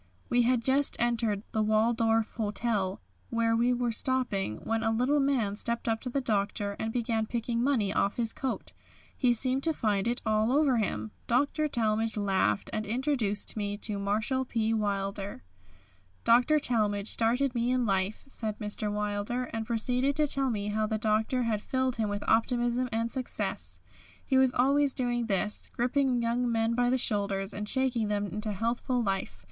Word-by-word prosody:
We 245 - +3
had 240 0 +2
just 270 +3 +2
entered 230 -4 0
the 220 - 0
Waldorf 225 +1 +2
Hotel, 210 -3 -1 0.3
where 230 -1 +1
we 240 +2 +2
were 245 -1 0
stopping, 225 - 0
when 225 0 -1
a 225 - +1
little 250 +6 +2
man 255 -8 +1
stepped 235 +3 -2
up 225 -1 0
to 255 - -4
the 275 - -1
Doctor 205 -3 -1
and 220 - -2
began 225 -2 -1
picking 235 0 -1
money 230 -8 +1
off 200 - +1
his 230 -2 0
coat. 265 -2 -4 0.4
He 250 -2 +2
seemed 255 +3 0
to 320 +2 +1
find 210 -6 0
it 240 +1 +1
all 215 +1 +2
over 280 -4 +3
him. 110 - -2 0.2
Dr. 285 +5 +1
Talmage 220 -3 +1
laughed, 190 - 0
and 215 0 -2
introduced 235 -4 0
me 205 -1 -2
to 205 -1 -3
Marshall 215 +6 0
P. 225 -3 -1
Wilder. 200 - -2 0.8
"Dr. 245 +6 +5
Talmage 210 -7 +1
started 245 +4 +2
me 240 0 0
in 250 -1 +1
life," 195 0 0
said 220 -6 -4
Mr. 210 -1 -2
Wilder, 210 +4 -2
and 225 -1 -3
proceeded 250 +4 +1
to 305 - +2
tell 275 -2 +1
me 210 -3 -2
how 215 +1 0
the 220 0 -1
Doctor 220 +3 +1
had 220 -3 -1
filled 260 0 -1
him 220 -2 0
with 205 0 -3
optimism 240 +2 +1
and 230 +1 -1
success. 260 -2 -1 0.4
He 265 - 0
was 265 -1 +5
always 275 +2 +2
doing 240 -2 -1
this, 210 0 0
gripping 250 0 +1
young 240 +1 0
men 225 0 +1
by 245 +1 +2
the 260 - +2
shoulders 200 -4 0
and 210 0 -4
shaking 255 -4 +1
them 205 0 -1
into 210 +1 -3
healthful 235 +4 -1
life. 195 - -2
230 Hz, 175 wpm, -29 LUFS, 210-250 Hz, 0.8 s, Dr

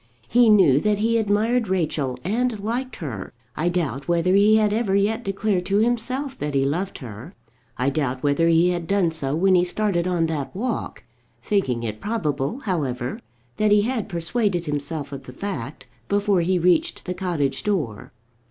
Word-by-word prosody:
He 240 0 +5
knew 185 -11 +6
that 210 +4 +1
he 230 +2 +2
admired 220 +3 +1
Rachel 155 -8 -1
and 225 +4 0
liked 240 +5 -3
her. 120 - -6 0.2
I 165 +4 0
doubt 155 -6 -2
whether 175 +1 +2
he 205 +2 +5
had 210 -1 +3
ever 215 -3 +1
yet 215 +4 +1
declared 195 -2 0
to 200 +1 +2
himself 250 +5 0
that 150 -1 -3
he 135 0 +2
loved 175 +8 -2
her. 110 -6 -10 0.4
I 130 +3 +1
doubt 135 -4 -2
whether 145 +3 +2
he 170 +1 +4
had 175 -2 -2
done 195 -3 +2
so 145 -3 -2
when 190 +3 +3
he 180 -1 +5
started 180 -1 0
on 175 -2 +1
that 155 -1 -3
walk, 235 +3 -3 0.4
thinking 130 - 0
it 110 -2 -4
probable, 155 - -2
however, 135 - -2 0.4
that 215 0 +2
he 205 0 +5
had 230 -3 -2
persuaded 175 +1 -1
himself 145 0 -4
of 135 -1 -8
the 125 - -10
fact 135 - -5 0.2
before 200 -2 +2
he 180 +2 +1
reached 175 -1 +1
the 180 - -2
cottage 165 -7 -1
door. 150 - -2
180 Hz, 175 wpm, -23 LUFS, 145-210 Hz, 0.4 s, knew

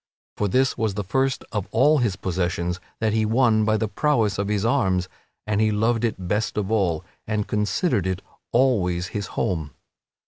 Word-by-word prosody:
For 105 - 0
this 130 +5 +1
was 110 -3 0
the 105 - -2
first 130 +7 0
of 105 -4 -2
all 145 +8 +4
his 115 -7 +1
possessions 90 -1 -2 0.2
that 110 -1 +1
he 110 0 +2
won 110 -1 +3
by 110 0 +2
the 110 - -1
prowess 110 -2 +1
of 100 - 0
his 105 0 0
arms 95 -8 +1 0.4
and 105 0 0
he 110 - +3
loved 115 +2 +1
it 95 -6 -2
best 105 +4 -1
of 105 0 -1
all 90 -8 +1 0.2
and 105 -1 -1
considered 105 - 0
it 95 +1 -2 0.3
always 95 -9 +2
his 100 +2 -4
home.) 80 -5 -1
105 Hz, 180 wpm, -24 LUFS, 95-115 Hz, 0.4 s, all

